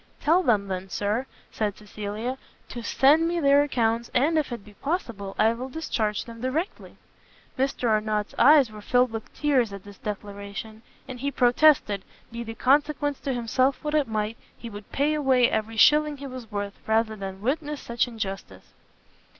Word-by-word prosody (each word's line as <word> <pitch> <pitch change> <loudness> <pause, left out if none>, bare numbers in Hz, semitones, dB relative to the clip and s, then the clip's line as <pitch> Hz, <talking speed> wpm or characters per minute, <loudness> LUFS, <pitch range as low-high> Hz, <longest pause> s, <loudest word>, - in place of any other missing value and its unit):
"Tell 335 +5 +3
them, 215 - +2
then, 190 0 -4
Sir," 210 +7 -1 0.2
said 210 -2 -2
Cecilia, 215 +4 -5 0.3
"to 240 - -6
send 295 +7 +4
me 340 0 0
their 280 -2 +5
accounts, 235 -4 0
and, 290 +6 +3
if 305 -4 0
it 235 -4 -6
be 210 - -15
possible, 225 - -4
I 220 +1 +4
will 255 +3 -6
discharge 225 -8 -2
them 230 -1 -10
directly." 295 +9 -3 0.6
Mr 265 -2 0
Arnott's 215 -1 0
eyes 285 -5 +6
were 210 -1 -10
filled 245 +2 +2
with 225 -1 -6
tears 265 -7 +2
at 200 -1 -8
this 205 -1 -13
declaration, 205 0 -7 0.3
and 255 -2 -7
he 280 +3 -1
protested, 245 -5 +3 0.3
be 235 0 -5
the 225 -1 -7
consequence 290 +2 +1
to 275 - -2
himself 255 +4 +1
what 300 0 -2
it 300 -2 +2
might, 215 +1 -2 0.2
he 235 - -8
would 205 0 -10
pay 290 +2 +1
away 265 -5 +3
every 220 +1 -2
shilling 300 +4 +5
he 280 - -8
was 255 -4 -8
worth, 205 0 -4
rather 220 0 +2
than 195 -2 -6
witness 295 +3 -1
such 235 +1 -1
injustice. 210 -5 -7
235 Hz, 175 wpm, -26 LUFS, 215-280 Hz, 0.6 s, eyes